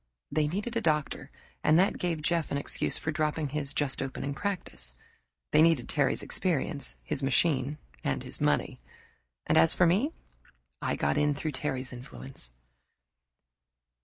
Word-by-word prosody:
They 155 -1 +2
needed 205 +9 -3
a 230 - +1
doctor, 150 -6 0 0.3
and 155 +1 +5
that 190 +3 +3
gave 165 -4 -1
Jeff 165 -1 +1
an 140 - -1
excuse 140 - -1
for 160 - -2
dropping 155 -1 0
his 140 -1 0
just 145 -2 0
opening 135 +1 -3
practice; 180 - -4 0.6
they - - +6
needed 165 0 +4
Terry's 145 -4 +1
experience, 155 -4 0
his - - -1
machine, 140 +1 +2 0.3
and 70 - -1
his - - -8
money; - - +1 0.7
and - - +4
as 80 - +7
for 180 - +5
me, 200 - +3 0.7
I - - 0
got 70 0 +1
in 150 -1 +2
through 155 +2 -2
Terry's 130 -2 -3
influence. 125 - -6
150 Hz, 150 wpm, -29 LUFS, 135-165 Hz, 0.7 s, as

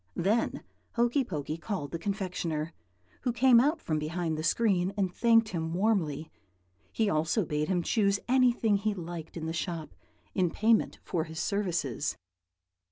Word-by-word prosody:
Then 210 +6 0 0.3
Hokey 240 +4 +2
Pokey 155 - -4
called 165 -6 -4
the 165 - -4
confectioner, 170 -5 -2 0.5
who 245 - 0
came 245 0 +6
out 300 +6 +2
from 155 - -1
behind 160 +1 -2
the 155 - -3
screen 185 +1 +2
and 190 -3 0
thanked 230 0 +4
him 165 -2 -3
warmly; 175 -7 0 0.6
he 220 - +1
also 165 +4 +1
bade 150 0 -1
him 180 -2 +1
choose 200 +1 +2
anything 245 -4 +3
he 210 +1 -1
liked 170 -2 -7
in 160 - -4
the 160 - -2
shop, 165 - -4 0.4
in 185 -3 +2
payment 220 +6 +2
for 165 -3 -1
his 160 0 -7
services. 175 - -1
180 Hz, 155 wpm, -29 LUFS, 160-220 Hz, 0.6 s, came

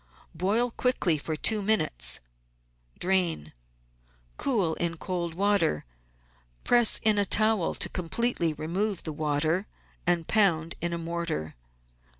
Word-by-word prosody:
Boil 210 +8 0
quickly 210 - +1
for 155 +2 -4
two 210 +7 +2
minutes, - - +2 0.8
drain, 175 - -1 0.8
cool 205 -12 0
in 170 0 -3
cold 170 -2 -4
water, 195 - +1 0.8
press 240 -2 +5
in 215 -1 +4
a - - +4
towel 215 -2 +2
to - - +2
com 180 -3 -6
pletely 175 -8 0
remove 190 +5 -2
the 155 - -4
water, 155 +5 -1 0.4
and 175 -2 +1
pound 170 -7 +2
in 170 +1 -1
a 170 - -2
mortar. 165 - -4
175 Hz, 125 wpm, -27 LUFS, 160-205 Hz, 0.8 s, press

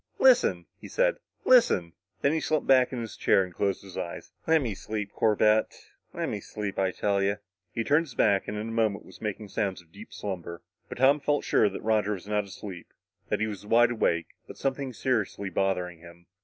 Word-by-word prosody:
"Listen," - - +4
he - - -10
said. - - +1 0.3
"Listen!" 95 - +4 0.3
Then 140 - +3
he 160 - +1
slumped 155 -1 0
back 130 -2 +5
in 125 -2 -3
his 115 - -6
chair 95 - +3
and 90 -1 -8
closed 100 +1 -1
his 95 -2 -7
eyes. 85 - -6 0.2
"Lemme 150 -9 +3
sleep, 105 0 -5
Corbett. 110 0 +2 0.2
Lemme - - -3
sleep, 105 -2 -5
I 95 -1 +2
tell 100 +1 0
you." 100 +1 +1 0.3
He 115 - -2
turned 160 +7 +2
his 130 - -12
back 100 -3 +3
and 105 - -4
in 110 +2 -4
a - - -5
moment 110 -3 0
was - - -15
making 105 -1 -4
sounds 95 -1 -1
of 85 -2 -20
deep 100 +4 -12
slumber, 85 -4 -6 0.3
but - - -7
Tom 135 +4 +5
felt 145 0 0
sure 105 - +3
that 100 - -7
Roger 105 -1 +2
was 95 -2 -7
not 105 0 0
asleep 95 -3 -9 0.4
that - - 0
he - - +3
was 105 -2 -6
wide 120 +3 +4
awake, 85 -8 0 0.2
with - - -10
something 135 -1 -2
seriously 110 -6 -1
bothering 90 -2 -1
him. 85 0 -15
105 Hz, 205 wpm, -28 LUFS, 95-120 Hz, 0.4 s, back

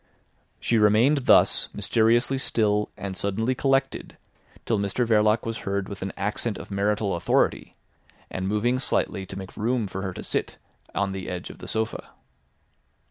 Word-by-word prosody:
She 115 - +1
remained 120 +7 +4
thus - - +5
mysteriously 120 +4 +2
still 105 -4 +1
and 95 -1 -5
suddenly 105 +6 -1
collected 135 +1 0 0.5
till 110 -3 +1
Mr 100 +5 0
Verloc 110 -1 +3
was 115 -1 -3
heard 100 0 -2
with 100 -2 -8
an 95 0 -3
accent 105 +2 -2
of - - -10
marital 100 0 0
authority, 85 - 0 0.6
and 95 0 -3
moving 115 +5 +1
slightly 95 -6 -1
to - - -7
make 95 -1 -8
room 115 +1 0
for 95 0 -5
her 95 -2 -4
to - - -7
sit - - -2 0.4
on 100 -1 0
the 95 -2 -5
edge 90 -1 -5
of - - -15
the - - -9
sofa. 110 0 -3
105 Hz, 160 wpm, -25 LUFS, 100-115 Hz, 0.6 s, thus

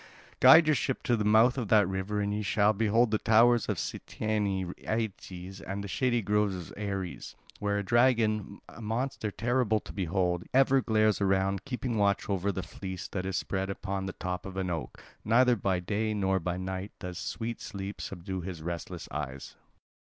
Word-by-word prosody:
Guide 160 0 +9
your 155 - +4
ship 135 -2 -1
to 120 - +2
the 105 - -1
mouth 110 +5 +4
of 120 - -3
that 105 -2 +5
river 95 +2 -2
and 100 0 -1
ye 105 - -1
shall 105 +1 +3
behold 110 +2 +2
the 110 - +2
towers 115 +1 +4
of - - 0
Cytaean 100 -4 -2
Aeetes 95 -4 -4
and 100 +1 -5
the - - -5
shady 120 +3 0
grove 105 -1 +1
of 90 -3 -8
Ares, 100 -3 -5 0.2
where 100 0 0
a 100 - -1
dragon, 110 -3 +2
a - - -12
monster 115 +1 -2
terrible 115 0 +1
to - - -10
behold, 90 -2 0
ever 135 0 +5
glares 110 -3 +2
around, 95 0 +1
keeping 125 -3 -3
watch 100 0 +2
over 100 0 0
the 95 -1 -4
fleece 95 +3 -7
that 95 -1 -3
is 95 -2 -1
spread 95 0 -2
upon 95 0 -3
the 95 - -4
top 90 0 -4
of 95 0 -8
an 95 -2 -1
oak; 80 -3 -5 0.2
neither 125 +3 +4
by 95 -3 0
day 105 +4 -1
nor 95 -1 +1
by 90 +1 -3
night 95 +2 -5
does 90 -1 -6
sweet 115 0 -4
sleep 100 -1 -6
subdue 95 0 -5
his 85 -3 -7
restless 85 0 -5
eyes." 65 -2 -5
100 Hz, 185 wpm, -29 LUFS, 95-110 Hz, 0.2 s, Guide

